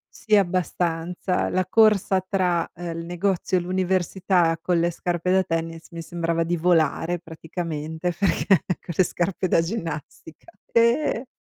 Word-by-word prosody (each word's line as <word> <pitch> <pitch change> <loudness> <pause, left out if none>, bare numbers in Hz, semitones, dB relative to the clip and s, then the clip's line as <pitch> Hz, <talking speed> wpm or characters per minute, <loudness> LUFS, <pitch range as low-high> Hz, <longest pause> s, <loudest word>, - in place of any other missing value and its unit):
Sì, 215 -2 +2
abbastanza. 180 -1 0
La 185 0 0
corsa 205 -2 +4
tra, 180 -3 +1
uhm, 175 0 -5
il 165 - -5
negozio 180 +1 0
e - - -1
l'università 185 -1 +1
con 175 -1 +1
le 170 - +2
scarpe 175 +1 -2
da 190 0 +4
tennis 165 -1 -4
mi 170 - -7
sembrava 165 0 -1
di 175 +1 -1
volare, 170 0 +1
praticamente. 160 0 -4
Perché 195 - +1 0.3
con 170 - -7
le 185 - +5
scarpe 180 +1 -1
da 165 - +4
ginnastica, 165 - -6 0.2
eh, 235 +2 +2
175 Hz, 140 wpm, -24 LUFS, 165-185 Hz, 0.3 s, le